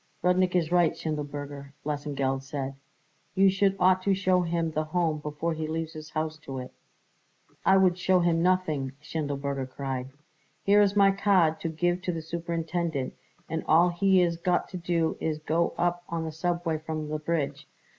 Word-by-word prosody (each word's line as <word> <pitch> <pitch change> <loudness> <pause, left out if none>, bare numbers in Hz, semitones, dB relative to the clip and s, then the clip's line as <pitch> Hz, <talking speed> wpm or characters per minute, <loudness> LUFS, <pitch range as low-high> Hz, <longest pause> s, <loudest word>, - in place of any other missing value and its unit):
"Rudnik 180 0 +3
is 170 -2 +1
right, 175 -2 +4
Schindelberger," 145 -2 -5
Lesengeld 140 -3 -1
said; 135 0 -4 0.6
"you 195 0 +5
should 195 0 +2
ought 185 0 +4
to 195 +1 +2
show 185 -1 +2
him 170 -1 -1
the 155 0 -1
Home 160 -1 0
before 150 +3 -3
he 155 0 -3
leaves 160 0 -3
his 155 0 -9
house 155 0 -3
to 135 -3 -7
it." 125 0 -6 1.0
"I 190 - +7
would 185 -2 +3
show 185 0 +3
him 170 -1 +2
nothing," 160 -7 +1
Schindelberger 140 -3 -3
cried. 130 -1 -4 0.5
"Here 205 +1 +5
is 200 0 +3
my 200 -1 +6
card 190 -5 +3
to 165 - -2
give 175 +3 0
to 185 - -1
the 165 -2 -5
superintendent, 165 -3 -2 0.3
and 160 +1 -3
all 170 +3 +5
he 185 +1 +3
is 170 -1 0
got 175 +1 0
to 185 - -5
do 170 -2 0
is 155 -1 -1
to 155 - -19
go 165 +2 +1
up 175 0 0
on 165 -1 -2
the 160 - -4
subway 170 0 -1
from 155 -1 -4
the 155 0 -2
bridge. 150 -2 -2
165 Hz, 180 wpm, -27 LUFS, 150-180 Hz, 1.0 s, I